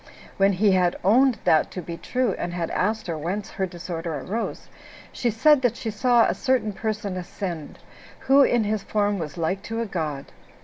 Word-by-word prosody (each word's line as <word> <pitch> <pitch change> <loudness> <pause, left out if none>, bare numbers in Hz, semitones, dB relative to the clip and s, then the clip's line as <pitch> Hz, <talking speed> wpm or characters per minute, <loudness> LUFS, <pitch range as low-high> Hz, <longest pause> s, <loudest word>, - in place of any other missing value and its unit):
When 195 0 +4
he 200 +2 +3
had 180 -2 +2
owned 245 +5 +4
that 155 - +3
to 180 - -4
be 170 +1 -6
true, 250 +4 -1
and 175 0 -3
had 170 -2 -2
asked 220 +3 0
her 170 - -3
whence 180 +7 -4
her 190 -1 -2
disorder 170 -2 -5
arose, 210 - -4 0.4
she 245 - -1
said 280 +6 +4
that 245 -3 +1
she 225 - -4
saw 240 +2 +4
a - - +1
certain 250 -5 0
person 210 -2 -3
ascend, 175 -3 -6 0.4
who 275 +1 +5
in 240 -4 +3
his 210 0 -1
form 205 -1 0
was 155 0 -6
like 170 +4 -1
to 225 0 -2
a 230 - -1
god. 155 -8 -4
200 Hz, 190 wpm, -24 LUFS, 175-225 Hz, 0.4 s, who